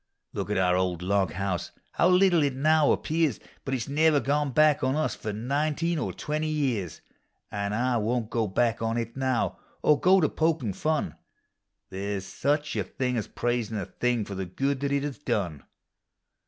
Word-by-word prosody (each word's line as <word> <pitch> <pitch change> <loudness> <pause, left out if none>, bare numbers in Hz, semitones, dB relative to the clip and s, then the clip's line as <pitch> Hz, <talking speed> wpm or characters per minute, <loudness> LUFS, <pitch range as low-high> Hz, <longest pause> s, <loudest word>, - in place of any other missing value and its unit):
Look - - -3
at 105 - 0
our 90 -1 +3
old 90 -2 -1
log 95 -3 +1
house— 95 -1 -2 0.2
how - - +3
little 180 -2 +5
it 140 -3 +1
now 155 +2 +4
ap - - 0
pears! 160 -5 +1 0.3
lint 135 - 0
it 120 - -2
s - - -10
never 150 +1 +3
gone 145 +1 0
back 150 +1 +4
on 130 +1 +1
us 155 - 0
for 105 - -5
nineteen 150 +9 -1
or - - -2
twenty 155 +1 -3
years; 130 - -1 0.5
An' 100 -1 -2
I 120 +2 +1
won't 115 +1 -1
go 115 -2 0
back 115 +4 +1
on 115 +1 0
it 115 -1 -3
now, 130 -2 0 0.2
or 150 -1 +4
go 190 +2 +5
to 155 - +3
pokin' 155 -9 0
fun 155 +8 -1 0.7
There 100 +1 -3
's 95 - -10
such 145 +9 -1
a - - 0
thing 125 -1 -2
as 110 - -2
praisiu' 120 -3 -2
a 95 - -3
thing 120 0 -1
for 100 - -7
the 95 -1 -4
good 135 +9 -1
that 140 0 -1
it 140 0 +1
has 145 -2 -4
done. 100 - -2
125 Hz, 195 wpm, -27 LUFS, 105-150 Hz, 0.7 s, little